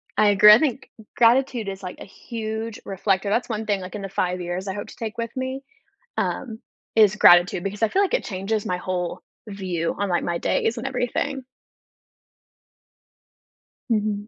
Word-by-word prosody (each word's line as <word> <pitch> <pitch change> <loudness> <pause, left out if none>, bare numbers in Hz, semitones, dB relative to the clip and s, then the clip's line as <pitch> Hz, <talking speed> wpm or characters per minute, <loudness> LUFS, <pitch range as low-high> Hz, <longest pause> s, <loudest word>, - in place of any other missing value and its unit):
I 210 -1 +4
agree, 210 +1 +8
I 215 - +7
think 275 -4 -1 0.3
gratitude 240 -1 +3
is 195 0 -6
like 180 - -7
a - - -8
huge 220 +1 -6
reflector, 195 +1 0
that's 235 +5 0
one 220 -1 -3
thing, 200 -2 0
like, 185 +2 -8
in 210 - -5
the 195 - -5
5 180 -1 -1
years, 175 +2 -4
I 190 - -2
hope 205 - -6
to - - -12
take 220 -2 -6
with 230 +1 -4
me, 260 +1 -4 0.5
um, 225 -4 -2 0.4
is 210 -2 +5
gratitude, 175 -2 +6
because 200 +3 -4
I - - +5
feel 390 - +2
like 400 +3 0
it - - +1
changes 200 +1 -3
my 180 - -1
whole 180 -1 -3 0.3
view 185 -5 -3
on, 200 -1 -1
like, 175 -1 0
my 170 0 -1
days 225 +6 0
and 235 - -4
everything. 265 +2 -2 2.5
Mhm. 210 -2 -1
210 Hz, 180 wpm, -23 LUFS, 190-230 Hz, 2.5 s, agree